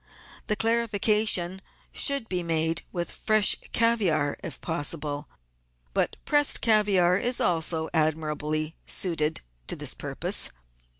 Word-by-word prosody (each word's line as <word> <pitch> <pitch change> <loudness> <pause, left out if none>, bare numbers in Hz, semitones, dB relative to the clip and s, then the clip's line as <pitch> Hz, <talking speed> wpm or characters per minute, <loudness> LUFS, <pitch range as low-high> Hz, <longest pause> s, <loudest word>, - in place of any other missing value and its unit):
The 210 - +2
clarification 210 -5 +1 0.3
should 280 -5 +1
be 180 -3 -2
made 165 -1 -1
with 175 -1 -3
fresh 215 -2 +3 0.2
caviare 190 -11 +1
if 165 -8 -6
pos 160 -4 0
sible, 145 -1 -6 0.7
but - - 0
pressed 290 -1 +3
caviare 200 -5 +3
is 245 +1 +2
also 160 -1 +1
admirably 155 0 -1
suited 160 -4 +1 0.3
to - - 0
this - - -2
purpose. - - 0
175 Hz, 115 wpm, -26 LUFS, 155-215 Hz, 0.7 s, fresh